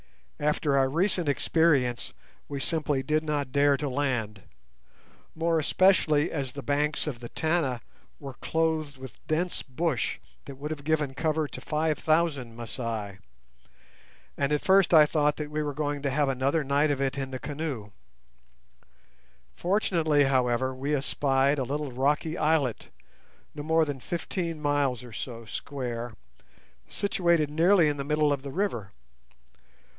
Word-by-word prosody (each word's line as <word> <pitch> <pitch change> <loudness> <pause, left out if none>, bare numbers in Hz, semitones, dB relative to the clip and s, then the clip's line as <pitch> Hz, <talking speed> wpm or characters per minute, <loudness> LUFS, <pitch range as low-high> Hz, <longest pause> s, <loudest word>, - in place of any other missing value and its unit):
After 150 -1 +1
our 135 -1 +3
recent 170 +1 +1
experience, 140 -5 +2 0.4
we 140 -1 -4
simply 145 -2 -1
did 155 +3 +1
not 145 -4 -2
dare 140 +1 +4
to 145 +1 -3
land, 125 -7 -1 0.9
more 165 0 +1
especially 155 -2 +3
as 135 -5 -3
the 140 - -7
banks 145 +1 0
of 140 -6 -4
the 120 -1 -8
Tana 155 -7 0 0.4
were 140 -2 -7
clothed 160 0 -1
with 130 -4 -11
dense 170 +3 -1
bush 135 -1 -1 0.3
that 140 - -8
would 145 +3 -6
have 145 -2 -5
given 150 -2 0
cover 155 +1 0
to - - -9
five 155 -1 0
thousand 155 -7 +1
Masai, 115 -4 -5 1.2
and 140 0 0
at 150 - +1
first 195 -1 +5
I 155 -3 +8
thought 150 -1 +1
that 150 -1 -5
we 155 0 -1
were 145 -2 -3
going 145 -1 -2
to 140 - 0
have 140 +1 +1
another 135 +4 +1
night 140 +2 +2
of 145 -2 0
it 135 0 -1
in 135 -1 -3
the 130 - -4
canoes. 140 -7 -5 1.6
Fortunately, 170 -6 +2
however, 130 -1 +1
we 140 +3 -1
espied 140 0 +1
a - - +1
little 145 +2 -3
rocky 145 +5 0
islet, 150 -6 +1 0.6
not 145 -1 -7
more 160 0 +4
than 145 -3 -4
fifteen 170 +1 -3
miles 145 -4 0
or 120 -2 -11
so 115 0 -6
square, 120 -1 -5 0.8
situated 170 -6 +1
nearly 170 +2 +4
in 145 -1 0
the 140 - -3
middle 150 0 +2
of 140 - -3
the 140 0 -7
river. 135 - -2
145 Hz, 150 wpm, -27 LUFS, 135-155 Hz, 1.6 s, I